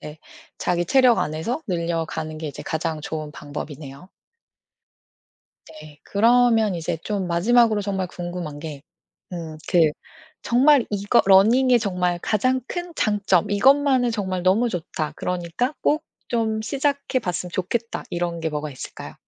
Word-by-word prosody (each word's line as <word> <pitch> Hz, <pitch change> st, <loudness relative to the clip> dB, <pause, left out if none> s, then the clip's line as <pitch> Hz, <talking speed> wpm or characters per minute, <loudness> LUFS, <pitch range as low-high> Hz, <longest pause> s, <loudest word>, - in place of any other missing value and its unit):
네 150 Hz, +1 st, -9 dB, 0.4 s
자기 175 Hz, -1 st, 0 dB
체력 255 Hz, +2 st, +5 dB
안에서 160 Hz, -, -2 dB
늘려가는 165 Hz, -3 st, -3 dB
게 155 Hz, -1 st, -4 dB
이제 140 Hz, -, -8 dB
가장 160 Hz, -1 st, -3 dB
좋은 155 Hz, -1 st, -5 dB
방법이네요. 145 Hz, +1 st, -8 dB, 1.7 s
네. 150 Hz, -1 st, -13 dB
그러면 225 Hz, -1 st, +3 dB
이제 165 Hz, 0 st, -2 dB
좀 200 Hz, -3 st, -2 dB
마지막으로 215 Hz, +5 st, +3 dB
정말 190 Hz, -2 st, -2 dB
궁금한 175 Hz, -4 st, -6 dB
게 150 Hz, -2 st, -8 dB, 0.5 s
음 165 Hz, -3 st, -6 dB
그 165 Hz, -4 st, +4 dB, 0.5 s
정말 260 Hz, +1 st, +4 dB
이거 205 Hz, +3 st, +2 dB
러닝의 235 Hz, +6 st, +5 dB
정말 180 Hz, -4 st, -1 dB
가장 255 Hz, +5 st, +1 dB
큰 350 Hz, -1 st, -5 dB
장점 205 Hz, -, +1 dB
'이것만은 260 Hz, +3 st, +4 dB
정말 190 Hz, -4 st, -2 dB
너무 205 Hz, +7 st, +3 dB
좋다. 160 Hz, -5 st, -4 dB
그러니까 180 Hz, -, -2 dB
꼭 305 Hz, +1 st, +1 dB, 0.2 s
좀 220 Hz, -2 st, -1 dB
시작해 280 Hz, +2 st, -1 dB
봤으면 180 Hz, -5 st, -4 dB
좋겠다.' 230 Hz, +6 st, -2 dB
이런 170 Hz, -1 st, -2 dB
게 160 Hz, -, -1 dB
뭐가 150 Hz, 0 st, -4 dB
있을까요? 130 Hz, -, -9 dB
185 Hz, 285 characters per minute, -23 LUFS, 165-235 Hz, 1.7 s, 체력